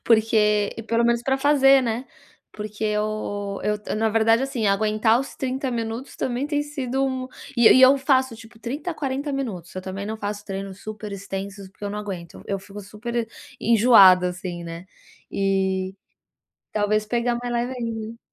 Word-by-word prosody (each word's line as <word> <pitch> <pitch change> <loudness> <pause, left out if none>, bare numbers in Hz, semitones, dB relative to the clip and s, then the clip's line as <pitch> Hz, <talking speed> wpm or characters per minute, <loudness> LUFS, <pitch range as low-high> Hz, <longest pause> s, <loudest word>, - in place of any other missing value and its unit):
porque 215 -2 +3
pelo 230 0 +2
menos 235 0 +2
pra 265 +2 +1
fazer, 275 -1 +5
né. 235 +2 -2 0.5
Porque 210 0 -7
eu 210 -1 -2
eu 210 0 0
t 210 - -5
na 220 +1 +1
verdade, 225 +2 +3
assim, 265 -5 -1
aguentar 215 +3 +3
os 270 - -7
30 265 0 -2
minutos 230 +2 -4
também 255 +3 -2
tem 290 -1 0
sido 270 -2 -2
mu 255 -1 -4 0.3
e 235 -1 +5
e 260 - +7
eu 260 +2 +8
faço 265 -2 +2
tipo 225 0 -14
30 280 +9 -4
a 330 - -4
40 280 0 -3
minutos, 210 - -4
eu 185 - -5
também 190 +1 -5
não 220 +1 -4
faço 205 -1 -5
treinos 195 0 -6
super 215 -1 -7
extensos, 195 0 -6
porque 195 +2 -12
eu 200 - -2
não 210 - -4
aguento, 185 -5 -7
eu 195 -1 -2
fico 200 +1 -10
super 225 +3 -4 0.3
e 230 - -2
enjoada, 195 -6 +7
assim 180 -1 -6
né. 170 +2 -8 0.4
E 190 -1 0 0.8
talvez 215 0 +1
pegar 240 +1 0
mais 245 0 -4
leve 240 +2 -1
ainda. 230 -1 -5
220 Hz, 175 wpm, -23 LUFS, 200-250 Hz, 0.8 s, eu